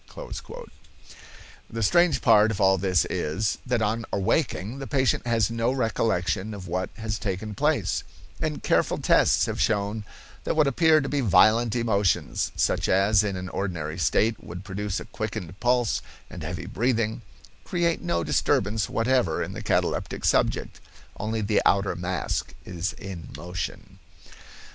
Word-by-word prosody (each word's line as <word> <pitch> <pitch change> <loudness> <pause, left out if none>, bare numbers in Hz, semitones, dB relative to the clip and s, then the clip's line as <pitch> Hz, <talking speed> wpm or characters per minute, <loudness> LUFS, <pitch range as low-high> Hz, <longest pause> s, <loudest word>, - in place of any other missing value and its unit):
The 115 0 -3
strange 155 - +3
part 105 +1 +6
of 110 - -3
all 95 -1 +4
this 90 -2 +2
is, 95 +8 -1
that 120 -3 +1
on 115 +2 0
awaking, 110 - 0
the 135 - -6
patient 130 -3 +1
has 115 -1 +2
no 115 +1 0
recollection 110 -5 0
of 95 -3 -8
what 90 +1 -2
has 110 -1 -3
taken 105 +2 -3
place, 140 - 0 0.4
and - - -2
careful - - +2
tests - - +3
have - - -3
shown 105 0 0 0.4
that - - -1
what 155 -1 +4
appear 155 +3 +4
to 135 - -3
be 145 0 0
violent 110 +2 +4
emotions, 100 - +1
such - - +1
as 100 +2 +4
in 100 -2 -2
an 90 0 -5
ordinary 85 -5 -3
state 110 +8 +1
would 90 +2 -8
produce 100 0 -3
a - - -8
quickened 90 +2 -5
pulse 120 -2 +1 0.3
and - - -8
heavy - - -5
breathing, 115 0 0 0.4
create 170 -2 0
no 85 0 -1
disturbance 105 +5 +1
whatever 115 -8 +1
in - - -6
the - - -6
cataleptic - - -1
subject; - - +1 0.4
only 110 +1 -2
the 105 0 +2
outer 100 0 +2
mask 90 -7 -3
is 90 0 -3
in 90 -6 -8
motion. 95 +3 -6
105 Hz, 150 wpm, -25 LUFS, 95-115 Hz, 0.4 s, part